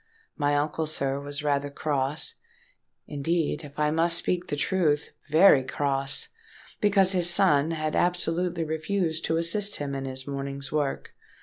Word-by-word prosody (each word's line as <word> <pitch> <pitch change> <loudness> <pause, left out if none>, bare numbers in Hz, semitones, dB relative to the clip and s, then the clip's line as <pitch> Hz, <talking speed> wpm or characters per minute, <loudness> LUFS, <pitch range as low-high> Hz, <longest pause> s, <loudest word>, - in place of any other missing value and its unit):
My 145 0 +1
uncle, 150 +2 -1
sir, 140 -2 -1
was 145 +1 -5
rather 145 -1 0
cross—indeed, 155 - -4
if 145 -1 -12
I 150 0 +1
must 165 +2 +2
speak 180 -1 -2
the - - -2
truth, 150 -2 0 0.2
very 155 -3 +6
cross; 135 +1 -1 0.5
because 195 -2 +4
his 175 -2 +4
son 165 -5 +4
had 155 -2 -2
absolutely 175 -1 0
refused 160 +1 -2
to 160 - 0
assist 200 +5 +1
him 145 -1 -4
in 135 0 -4
his 130 0 -5
morning's 140 0 -5
work. 145 -3 -2
155 Hz, 140 wpm, -26 LUFS, 140-175 Hz, 0.5 s, very